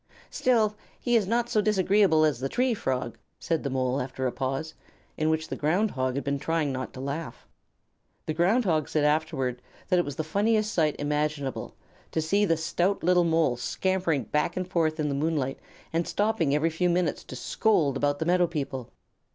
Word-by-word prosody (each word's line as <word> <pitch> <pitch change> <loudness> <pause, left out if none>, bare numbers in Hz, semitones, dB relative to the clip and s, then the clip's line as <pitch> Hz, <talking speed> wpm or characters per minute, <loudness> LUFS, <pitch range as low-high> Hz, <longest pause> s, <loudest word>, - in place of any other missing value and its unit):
"Still 220 -4 +2 0.2
he 240 -1 +1
is 215 -5 +3
not 235 +2 +1
so 215 - +2
disagreeable 195 -5 +3
as 145 -6 +1
the 135 +1 -2
Tree 250 0 +1
Frog," 125 - -3 0.2
said 165 -2 -1
the 140 - -3
Mole, 130 0 0
after 130 +1 -4
a 125 - +1
pause 135 +5 -3 0.4
in 155 0 0
which 160 0 0
the - - -3
Ground 180 +8 +1
Hog 130 -1 -1
had 140 - -2
been 140 0 -1
trying 160 -1 0
not 130 -1 -4
to - - -9
laugh. 140 -1 -5 0.8
The 155 - -2
Ground 195 +9 +2
Hog 155 -5 +1
said 155 - +1
afterward 145 -5 0 0.3
that 180 -2 +4
it 175 - +1
was 145 - -5
the 155 - -2
funniest 215 +5 +1
sight 155 -3 +2
imaginable 150 -2 -2 0.4
to - - +1
see 200 +7 +2
the 165 -4 +2
stout 175 +4 0
little 180 0 +4
Mole 160 -7 +2
scampering 175 +2 0
back 150 +3 -1
and 185 -1 -2
forth 160 -3 0
in 150 - 0
the 140 - -1
moonlight, 140 -2 -1 0.3
and 165 +1 0
stopping 190 -9 +1
every 160 +2 +1
few 180 +3 +1
minutes 175 -3 0
to - - -8
scold 145 - +1
about 145 +1 +1
the 160 - -2
Meadow 175 +1 +3
People. 135 -6 -4
160 Hz, 195 wpm, -27 LUFS, 140-180 Hz, 0.8 s, that